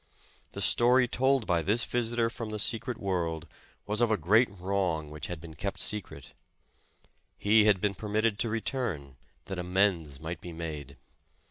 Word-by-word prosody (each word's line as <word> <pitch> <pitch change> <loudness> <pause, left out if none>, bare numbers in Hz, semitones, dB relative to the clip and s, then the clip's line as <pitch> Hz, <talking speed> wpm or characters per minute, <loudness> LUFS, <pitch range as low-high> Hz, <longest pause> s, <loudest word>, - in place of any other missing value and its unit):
The - - -5
story 125 +1 +5
told 130 0 +2
by 85 -2 +1
tliis 110 +7 +1
visitor 120 -1 0
from 115 -2 -6
the 110 - -4
secret 115 +3 0
world, 85 -5 -2 0.4
was 105 +2 0
of 120 - +4
a 110 - +2
great 110 - +4
wrong 90 -5 -2
which 75 0 -6
had 90 -2 -5
been 80 0 -10
kept 95 +6 -4
secret. 90 -9 -2 1.0
He 105 +1 +4
had 105 -3 +4
been 105 +1 0
permitted 105 +2 -1
to 115 - 0
return, 110 - -3 0.3
that 95 -2 -5
amends 90 -6 +1
might 80 +2 -6
be 90 -2 -8
made. 75 -4 -6
100 Hz, 160 wpm, -29 LUFS, 85-115 Hz, 1.0 s, story